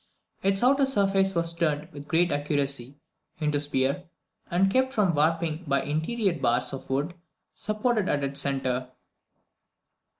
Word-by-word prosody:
Its 195 +2 +2
outer 275 +2 +4
surface 195 -5 +2
was 170 0 +3
turned 155 -3 -1
with 145 0 -10
great 170 +1 +2
accuracy 140 -3 -2 0.4
into 150 -2 +1
a - - -3
sphere, 140 +4 -1 0.4
and 190 +2 +2
kept 260 +2 +2
from 205 -8 +2
warping 160 +2 +1
by 140 0 +2
interior 185 +7 0
bars 120 0 +1
of 135 - -8
wood 140 +6 -1 0.4
supported 215 -1 -1
at 145 -1 0
its 140 0 0
centre. 130 -2 -1
160 Hz, 140 wpm, -27 LUFS, 140-195 Hz, 0.4 s, outer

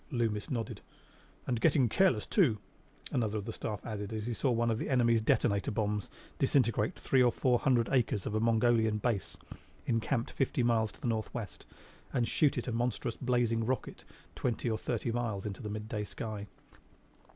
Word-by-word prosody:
Loomis 115 -7 -1
nodded. 115 -5 -3 0.6
"And 120 -2 -1
getting 145 -6 +4
careless, 150 - +3
too," 145 - +3 0.5
another 110 -3 0
of 100 - -4
the 115 - -4
Staff 105 -2 -5
added 105 -2 -4
as 110 -1 -3
he 120 - -2
saw 130 - 0
one 120 -1 +2
of 110 - -1
the - - -3
enemy's 120 -4 +3
detonator 100 -2 +2
bombs 105 -2 -1 0.3
disintegrate 115 -6 +2
three 130 - +2
or 120 -1 +5
four 125 0 +2
hundred 120 -4 +2
acres 115 -7 +1
of - - -3
a 110 - +1
Mongolian 115 -1 +3
base 105 -2 -1 0.5
encampment 115 +1 -1
fifty 130 -2 +1
miles 115 -3 +2
to - - -19
the - - -2
northwest 110 -2 -4 0.4
and 120 -2 +1
shoot 145 +3 +2
it 125 - -3
a - - -1
monstrous 120 0 -1
blazing 120 -3 +1
rocket 130 +3 -3 0.3
twenty 120 -1 -1
or 110 - 0
thirty 115 0 -2
miles 115 -4 -2
into 100 -2 -5
the 105 - -5
midday 105 0 -4
sky. 105 -1 -5
115 Hz, 175 wpm, -32 LUFS, 110-125 Hz, 0.6 s, or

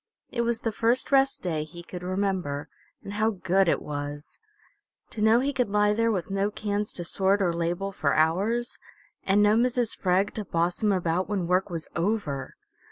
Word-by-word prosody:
It 235 - -1
was 235 -1 -1
the 225 - -1
first 235 +6 +1
rest 270 0 +3
day 160 -4 -1
he 170 +3 -11
could 175 +1 -8
remember, 185 -6 -2 0.3
and 200 - -7
how 215 +2 +2
good 190 -2 +1
it - - +2
was! 145 0 -6 0.7
To 215 - -4
know 220 +3 +5
he 280 +2 -1
could 250 -5 0
lie 210 0 +3
there 230 +1 +2
with 190 -2 -3
no 195 +1 +1
cans 210 0 -3
to 175 - -5
sort 190 +4 +1
or 180 -4 +1
label 175 +4 -2
for 150 -7 0
hours, 200 +10 +1 0.4
and 200 +2 +3
no 210 +1 +5
Mrs. 245 0 +1
Freg 190 +2 +1
to 215 - -4
boss 175 -1 -1
him 210 -1 +3
about 180 -1 0
when 195 -4 -1
work 180 +3 +1
was 165 -3 -3
over! 170 -8 -2
195 Hz, 190 wpm, -26 LUFS, 170-215 Hz, 0.7 s, know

